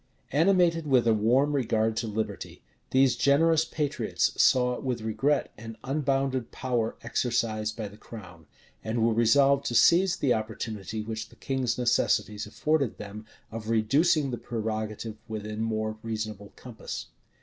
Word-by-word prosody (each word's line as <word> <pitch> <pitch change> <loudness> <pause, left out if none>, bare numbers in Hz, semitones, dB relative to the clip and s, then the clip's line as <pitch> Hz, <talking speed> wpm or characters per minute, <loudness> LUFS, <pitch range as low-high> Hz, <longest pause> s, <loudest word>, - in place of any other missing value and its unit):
Animated 165 0 +3
with 130 -4 +3
a 115 - +4
warm 120 +7 +2
regard 110 -5 +1
to 115 - -1
liberty, 110 +1 -5 0.3
these 130 0 +4
generous 160 +3 +3
patriots 150 -3 -1
saw 125 -1 +3
with 125 -3 -3
regret 110 +7 0
an 115 0 -9
unbounded 135 -2 -1
power 120 -4 -2
exercised 110 -3 -1
by 110 -2 -4
the 100 +1 -13
crown, 90 -9 -12 0.4
and 110 +1 0
were 115 - +2
resolved 135 +5 +4
to 120 - -2
seize 175 +7 +5
the 130 -3 +1
opportunity 110 -1 -4
which 110 0 -5
the - - -18
king's 130 -3 -2
necessities 105 -4 +1
offered 145 +3 0
them, 105 +1 -9 0.2
of 110 0 -6
reducing 140 +7 +2
the 120 - -4
prerogative 110 -1 -4
within 110 -1 -5
more 110 -1 -2
reasonable 110 -2 -5
compass. 120 -3 -7
115 Hz, 140 wpm, -27 LUFS, 110-135 Hz, 0.4 s, seize